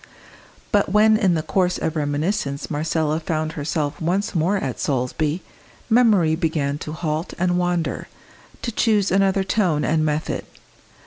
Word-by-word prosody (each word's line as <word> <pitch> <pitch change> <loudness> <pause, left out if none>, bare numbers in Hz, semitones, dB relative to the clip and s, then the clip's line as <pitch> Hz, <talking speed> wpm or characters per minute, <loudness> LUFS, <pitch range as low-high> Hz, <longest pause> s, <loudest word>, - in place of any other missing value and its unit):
But 205 -2 +2
when 215 +2 +5
in 195 -5 +2
the 155 - -1
course 180 0 +1
of 160 - -2
reminiscence 145 +1 -2
Marcella 155 +1 0
found 155 -1 -2
herself 150 0 -3
once 190 +6 0
more 180 +4 +1
at 135 -10 -4
Solesby, 145 +5 -1 0.5
memory 210 -9 +4
began 155 -4 -1
to 155 - -6
halt 155 +1 -3
and 180 0 +1
wander, 175 -2 -1 0.6
to 235 - -2
choose 210 -3 +2
another 195 0 +3
tone 185 -7 +1
and 155 0 +1
method. 155 0 -1
165 Hz, 140 wpm, -22 LUFS, 155-195 Hz, 0.6 s, when